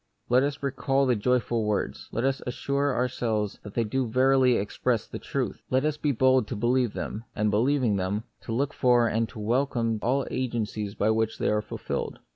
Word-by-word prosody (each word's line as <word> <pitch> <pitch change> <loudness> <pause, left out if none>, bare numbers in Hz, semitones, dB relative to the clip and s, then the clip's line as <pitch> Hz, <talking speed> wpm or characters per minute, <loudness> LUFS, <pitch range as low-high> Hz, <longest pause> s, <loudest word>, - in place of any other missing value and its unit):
Let 125 +1 +5
us 145 +1 -2
recall 135 0 +1
the 125 -2 +3
joyful 120 0 +1
words; 105 -1 -2
let 115 - -2
us 135 0 0
as 125 - -5
sure 140 0 0
ourselves 115 -4 -1
that 100 - -10
they 115 - +2
do 125 +4 -1
verily 130 +2 +4
express 100 -1 -1
the - - -7
truth; - - -3
let 130 +3 +2
us 155 -1 +1
be 150 -1 0
bold 130 -2 +3
to 120 - -4
believe 120 +1 +1
them, 110 +3 -5
and, 105 0 +1
believing 120 0 +2
them, 95 +3 -1 0.2
to - - -7
look 140 +5 0
for 120 -2 +4
and 115 0 0
to - - -12
welcome 115 0 0
all 135 +3 +1
agencies 110 -5 -2
by 105 +2 +2
which 110 0 0
they - - 0
are 105 0 +2
fulfilled. 105 - -4
120 Hz, 200 wpm, -27 LUFS, 110-130 Hz, 0.2 s, Let